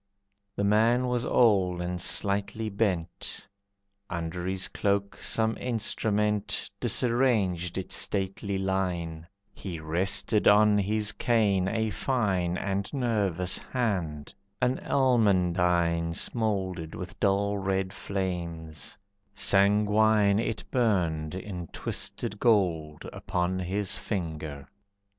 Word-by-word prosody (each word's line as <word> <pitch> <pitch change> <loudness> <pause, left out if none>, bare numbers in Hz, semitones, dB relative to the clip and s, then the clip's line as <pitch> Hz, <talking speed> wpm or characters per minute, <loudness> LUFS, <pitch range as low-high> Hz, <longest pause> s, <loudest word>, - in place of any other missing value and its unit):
The 100 - -1
man 115 +5 +3
was 125 -1 0
old 95 -8 +3
and 90 0 -3
slightly 100 +4 0
bent, 95 -5 -2 0.6
Under 85 +1 -4
his 95 0 -1
cloak 100 0 -1
some 110 0 0
instrument 105 -3 0
Disarranged 110 -9 +1
its 95 - -3
stately 95 +1 -1
line, 90 -4 -2 0.3
He 90 -4 -6
rested 95 +7 0
on 105 0 +6
his 105 +1 0
cane 105 -6 +2
a 110 +1 0
fine 95 -8 0
And 100 0 -2
nervous 100 - 0
hand, 90 - -2 0.3
an 125 +1 +1
almandine 90 -9 +2
Smouldered 95 -9 -1
with 90 -1 -8
dull 100 0 +1
red 95 0 -1
flames, 85 -5 -4 0.4
sanguine 105 +1 +4
It 115 -1 -2
burned 90 - +1
in 95 -3 -6
twisted 105 +6 -4
gold, 85 -10 +1
upon 90 +1 -2
His 95 +3 0
finger. 80 -9 -4
100 Hz, 100 wpm, -28 LUFS, 90-105 Hz, 0.6 s, on